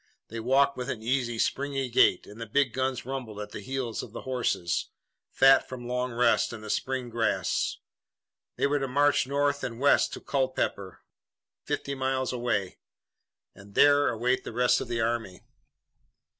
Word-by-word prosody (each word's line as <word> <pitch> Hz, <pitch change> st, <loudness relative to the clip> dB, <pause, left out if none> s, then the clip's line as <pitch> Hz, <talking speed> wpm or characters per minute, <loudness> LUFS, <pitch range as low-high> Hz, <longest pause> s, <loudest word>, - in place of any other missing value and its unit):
They 115 Hz, -, -6 dB
walked 135 Hz, +4 st, +2 dB
with 125 Hz, +1 st, -4 dB
an 110 Hz, -4 st, -4 dB
easy, 120 Hz, -1 st, 0 dB
springy 135 Hz, +2 st, -1 dB
gait, 115 Hz, -6 st, +3 dB
and 105 Hz, +3 st, -12 dB
the 115 Hz, -, -5 dB
big 135 Hz, +1 st, +1 dB
guns 130 Hz, -1 st, -2 dB
rumbled 125 Hz, -5 st, -5 dB
at 105 Hz, 0 st, -7 dB
the -, -, -6 dB
heels 125 Hz, +1 st, -3 dB
of -, -, -10 dB
the -, -, -6 dB
horses, 125 Hz, -9 st, -1 dB, 0.4 s
fat 135 Hz, 0 st, +5 dB
from 125 Hz, -2 st, -7 dB
long 125 Hz, +1 st, -2 dB
rest 120 Hz, +1 st, +2 dB
and 115 Hz, -2 st, -8 dB
the 105 Hz, -, -4 dB
spring 130 Hz, -2 st, -2 dB
grass. 115 Hz, -1 st, 0 dB, 0.8 s
They -, -, 0 dB
were 145 Hz, +1 st, +1 dB
to 135 Hz, -, -2 dB
march 145 Hz, +1 st, +2 dB
north 140 Hz, +1 st, 0 dB
and 115 Hz, -1 st, -4 dB
west 140 Hz, +1 st, +4 dB
to -, -, -6 dB
Culpeper, 130 Hz, -8 st, -2 dB, 0.6 s
fifty 140 Hz, -, -3 dB
miles 130 Hz, -1 st, -1 dB
away, 120 Hz, -6 st, -2 dB, 0.7 s
and 100 Hz, +1 st, -16 dB
there 145 Hz, 0 st, +5 dB
await 125 Hz, +2 st, 0 dB
the -, -, -6 dB
rest 125 Hz, +2 st, +2 dB
of -, -, -5 dB
the 115 Hz, -1 st, -1 dB
army. 115 Hz, -5 st, -2 dB
125 Hz, 170 wpm, -28 LUFS, 115-135 Hz, 0.8 s, fat